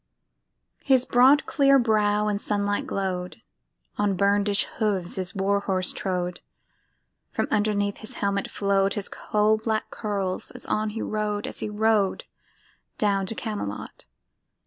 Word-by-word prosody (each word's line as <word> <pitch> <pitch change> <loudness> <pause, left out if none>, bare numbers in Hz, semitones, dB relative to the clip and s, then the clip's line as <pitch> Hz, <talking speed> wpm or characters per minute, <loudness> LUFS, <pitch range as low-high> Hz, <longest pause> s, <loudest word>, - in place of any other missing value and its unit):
His 260 -2 +4
broad 260 +4 +5
clear 275 -2 +4
brow 210 -3 +2
in 205 -1 0
sunlight 205 -1 -1
glow'd; 185 -2 -3 0.6
On 205 -2 +2
burnish'd 200 +1 +2
hooves 200 -5 0
his 185 +1 -2
war 200 +1 +1
horse 185 -2 -1
trode; 180 -2 -3 0.9
From - - -1
underneath 205 -1 +1
his 230 +3 -10
helmet 200 -1 -1
flow'd 200 -1 +1
His 205 -2 -2
coal 215 0 +1
black 220 0 -2
curls 200 -4 -3
as - - -5
on 215 0 0
he 220 +1 -4
rode, 210 -1 -2
As - - -6
he - - -2
rode 210 -2 +1 0.7
down 200 -2 +1
to 225 - -5
Camelot. 205 - -5
205 Hz, 135 wpm, -25 LUFS, 195-215 Hz, 0.9 s, broad